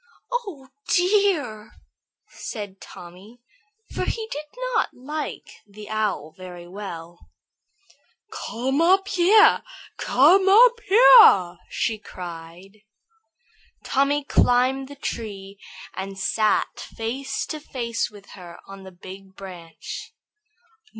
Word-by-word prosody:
"Oh, 395 - -5 0.2
dear!" 355 - +1 0.5
said 205 -4 -8
Tommy, 185 +7 -13 0.5
for - - -2
he 445 -1 -3
did 300 +1 -6 0.3
not 450 - +1
like 300 +4 -7
the 210 +1 -12
Owl 205 -8 -2
very 180 -2 -10
well. 175 -3 -9 1.2
"Come 265 +6 -1
up 380 +3 +3
here! 405 +5 +5 0.4
Come 365 +9 +4
up 470 +4 +6
here!" 415 - +7
she 220 -2 -2
cried. 180 +2 -11 1.0
Tommy 280 +2 +1
climbed 260 0 +2
the 285 - -11
tree 200 -7 -7 0.3
and 195 +1 -6
sat 215 +2 0
face 245 +5 -4
to 310 - -6
face 235 -5 -3
with 205 -1 -16
her 175 -3 -12
on 195 0 -11
the 190 0 -11
big 190 +1 -13
branch. 180 -4 -10
220 Hz, 105 wpm, -23 LUFS, 190-300 Hz, 1.2 s, here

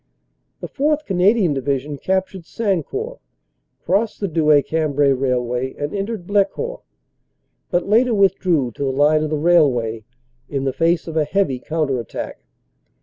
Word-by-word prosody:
The - - -5
4th. 300 +1 0
Canadian 190 -2 +2
Division 140 +1 -2
captured 190 -1 -2
Sancourt, 230 - -3 0.7
crossed 210 +4 0
the 200 - -1
Douai 155 -3 +4
Cambrai 145 -3 +1
Railway 125 -1 -1
and 145 0 -4
entered 200 -1 -4
Blecourt, 205 - -1 0.9
but 175 - 0
later 230 +3 +3
withdrew 180 -9 +2
to 140 - -6
the 135 - 0
line 145 +3 +3
of 155 - -2
the 155 - -1
railway 135 -9 +2 0.5
in 135 -2 -2
the 135 -1 -1
face 165 +3 +1
of 160 - -6
a 155 - +3
heavy 150 -6 0
counter 150 -3 -1
attack. 115 - -6
160 Hz, 145 wpm, -20 LUFS, 140-195 Hz, 0.9 s, Douai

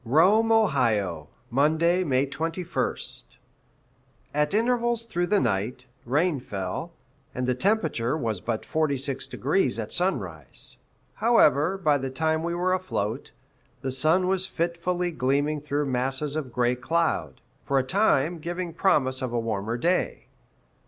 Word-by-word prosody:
Rome, 190 - +4
O., 110 - +2 0.2
Monday, 160 +7 +3
May 135 -4 +2
21st. 165 - -3 1.0
At 150 +5 +1
intervals 235 0 +1
through 175 -5 -1
the 205 +1 +3
night, 115 - -1 0.2
rain 150 +4 +1
fell, 95 -6 -5 0.4
and 125 - -1
the 125 - +2
temperature 160 - 0
was 110 - -2
but 115 -2 -2
46° 140 - 0
at 110 -2 -4
sunrise. 95 - -2 0.4
However, 190 - +3
by 150 -6 +2
the 135 0 -3
time 160 +4 0
we 170 +1 -2
were 180 +1 +1
afloat, 135 - -2 0.5
the 130 - -1
sun 160 +7 +3
was 190 0 +1
fitfully 175 +1 -1
gleaming 145 +1 0
through 145 0 -1
masses 135 +3 -1
of 145 -5 -3
gray 120 0 +2
cloud, 165 +6 -1 0.2
for 140 - 0
a 135 - +3
time 170 -1 +2
giving 175 +1 -4
promise 130 -9 +2
of 130 -2 -2
a 120 - 0
warmer 115 0 -2
day. 175 +8 0
150 Hz, 130 wpm, -26 LUFS, 125-175 Hz, 1.0 s, Rome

